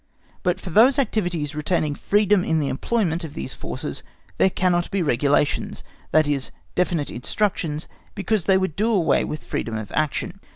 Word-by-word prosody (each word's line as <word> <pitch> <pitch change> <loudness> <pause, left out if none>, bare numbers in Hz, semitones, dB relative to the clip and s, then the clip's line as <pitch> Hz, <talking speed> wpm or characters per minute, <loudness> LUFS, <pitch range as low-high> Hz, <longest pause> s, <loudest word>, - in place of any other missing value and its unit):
But 180 0 0
for 185 - -7
those 250 - +6
activities 175 - 0
retaining 150 0 0
freedom 205 +3 +2
in 160 -2 +1
the 140 -2 0
employment 175 - 0
of 160 - -7
these 65 - -4
forces - - -6 0.4
there - - +5
cannot 175 -2 +1
be 195 -2 0
regulations, 145 +1 +1 0.3
that 155 -1 +4
is, 140 -3 0 0.2
definite 175 -5 0
instructions, 165 - -2 0.3
because 200 -1 0
they 190 -1 +5
would 190 -5 -1
do 220 +3 +1
away 190 -7 +3
with 150 - -5
freedom 115 -1 -3
of 110 -1 -6
action. 155 -2 -1
175 Hz, 165 wpm, -23 LUFS, 150-195 Hz, 0.4 s, those